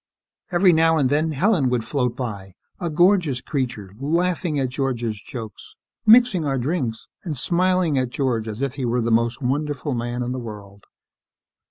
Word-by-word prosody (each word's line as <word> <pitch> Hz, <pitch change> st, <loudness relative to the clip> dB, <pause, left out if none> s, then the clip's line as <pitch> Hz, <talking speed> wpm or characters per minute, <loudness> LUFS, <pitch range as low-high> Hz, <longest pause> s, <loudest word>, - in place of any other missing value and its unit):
Every 180 Hz, 0 st, +5 dB
now 165 Hz, 0 st, +4 dB
and 135 Hz, -3 st, +2 dB
then, 155 Hz, +2 st, +1 dB
Helen 160 Hz, -, +2 dB
would 125 Hz, -2 st, -1 dB
float 125 Hz, -4 st, -1 dB
by, 100 Hz, -7 st, -6 dB, 0.2 s
a 170 Hz, -, -2 dB
gorgeous 175 Hz, -4 st, +3 dB
creature, 120 Hz, -10 st, -4 dB
laughing 165 Hz, +1 st, 0 dB
at 130 Hz, -2 st, 0 dB
George's 120 Hz, -5 st, -2 dB
jokes, 110 Hz, -2 st, -9 dB, 0.3 s
mixing 225 Hz, -6 st, +6 dB
our 135 Hz, -2 st, 0 dB
drinks, 130 Hz, -4 st, -2 dB, 0.2 s
and 155 Hz, -6 st, -4 dB
smiling 180 Hz, -1 st, +2 dB
at 130 Hz, -1 st, -1 dB
George 120 Hz, -4 st, -1 dB
as 110 Hz, +4 st, -4 dB
if 135 Hz, -2 st, -1 dB
he 135 Hz, -, -3 dB
were 120 Hz, +1 st, 0 dB
the 115 Hz, 0 st, -1 dB
most 115 Hz, +3 st, +1 dB
wonderful 145 Hz, +2 st, -1 dB
man 120 Hz, +1 st, -2 dB
in 125 Hz, -, -3 dB
the 130 Hz, -, -3 dB
world. 100 Hz, -4 st, -10 dB
135 Hz, 170 wpm, -22 LUFS, 120-160 Hz, 0.3 s, mixing